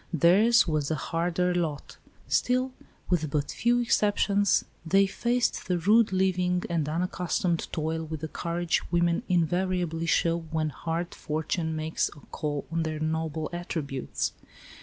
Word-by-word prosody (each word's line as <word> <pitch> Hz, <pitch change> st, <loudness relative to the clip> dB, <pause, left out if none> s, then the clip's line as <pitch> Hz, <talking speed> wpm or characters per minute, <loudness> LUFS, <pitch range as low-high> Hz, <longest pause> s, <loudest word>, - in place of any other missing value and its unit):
Theirs 195 Hz, +8 st, +5 dB
was 155 Hz, -3 st, 0 dB
the 160 Hz, -, 0 dB
harder 175 Hz, +3 st, 0 dB
lot. 160 Hz, -5 st, -3 dB, 0.3 s
Still, 255 Hz, +1 st, +1 dB, 0.4 s
with 160 Hz, -4 st, +1 dB
but 145 Hz, 0 st, -1 dB
few 240 Hz, +1 st, +2 dB
exceptions, 205 Hz, -3 st, +2 dB, 0.2 s
they 195 Hz, +4 st, +4 dB
faced 240 Hz, +5 st, 0 dB
the 180 Hz, -1 st, +1 dB
rude 210 Hz, +5 st, +4 dB
living 180 Hz, -1 st, +1 dB
and 160 Hz, -3 st, 0 dB
unaccustomed 175 Hz, 0 st, -1 dB
toil 160 Hz, +1 st, -2 dB
with 155 Hz, -1 st, -6 dB
the 160 Hz, -, -3 dB
courage 170 Hz, +1 st, -1 dB
women 170 Hz, +1 st, +2 dB
invariably 175 Hz, -1 st, 0 dB
show 170 Hz, 0 st, +2 dB
when 155 Hz, -1 st, 0 dB
hard 165 Hz, +4 st, -3 dB
fortune 160 Hz, +1 st, -2 dB
makes 155 Hz, +1 st, -1 dB
a 145 Hz, -, -14 dB
call 145 Hz, -2 st, -3 dB
on 165 Hz, 0 st, 0 dB
their 155 Hz, -1 st, -2 dB
nobler 160 Hz, 0 st, -2 dB
attributes. 155 Hz, -6 st, -3 dB
170 Hz, 140 wpm, -27 LUFS, 160-185 Hz, 0.4 s, Theirs